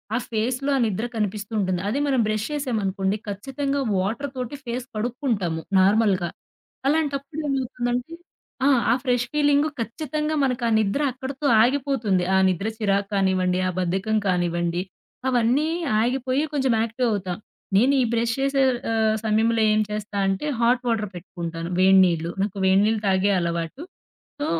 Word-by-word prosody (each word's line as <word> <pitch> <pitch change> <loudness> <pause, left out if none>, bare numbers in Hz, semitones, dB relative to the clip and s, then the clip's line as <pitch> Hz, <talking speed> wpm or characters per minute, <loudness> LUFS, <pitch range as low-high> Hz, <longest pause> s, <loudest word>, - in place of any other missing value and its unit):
ఆ - - +3
ఫేస్‌లో 250 +5 -1
ఆ - - 0
నిద్ర 215 +1 -2
కనిపిస్తూ 210 0 -3
ఉంటుంది. 185 -2 0
అది 235 +7 0
మనం 265 -3 +2
బ్రష్ 215 0 -1
చేశామనుకోండి 210 -8 -1
ఖచ్చితంగా 270 +7 -3 0.2
వాటరుతోటి 250 +6 -3
ఫేస్ 245 +1 -4
కడుక్కుంటాము 215 - -2 0.2
నార్మల్‌గా. 195 -2 +3 0.6
అలాంటప్పుడు 290 0 -1
ఏమవుతుందంటే 250 +1 -2 0.5
ఆ! - - +5 0.2
ఆ - - +6
ఫ్రెష్ 245 -2 +1
ఫీలింగు 290 0 +3
ఖచ్చితంగా 300 +6 -2
మనకా 250 -3 0
నిద్ర 215 +6 0
అక్కడితో 265 +3 -6 0.2
ఆగిపోతుంది. 250 -8 +1
ఆ - - +5
నిద్ర 185 +3 -1
చిరాకు 200 -2 0
కానివ్వండి, 185 -2 +1
ఆ - - +1
బద్ధకం 190 +5 0
కానివ్వండి, 175 -1 0 0.5
అవన్నీ 250 +4 +2 0.3
ఆగిపోయి 255 +3 0
కొంచెం 265 -4 +1
యాక్టీవవుతాం. 220 -6 -1 0.4
నేనీ 265 +7 +4
బ్రష్ 230 0 +1
చేసే 275 0 +1 0.3
ఆహ్, 220 -1 +2
సమయంలో 225 +1 +2
ఏం 215 - +2
చేస్తా 210 -1 -4
అంటే 195 +8 -1
హాట్ 240 +1 +3
వాటర్ 220 -3 0
పెట్టుకుంటాను 170 -2 -6
వేడి 190 +1 +6
నీళ్ళు. 170 -1 -1
నాకు 200 -1 -4
వేడి 190 +1 +5
నీళ్ళు 220 0 +1
తాగే 190 +1 +3
అలవాటు. 170 - -3 0.6
సో, 290 - -1
225 Hz, 135 wpm, -24 LUFS, 195-265 Hz, 0.6 s, ఆ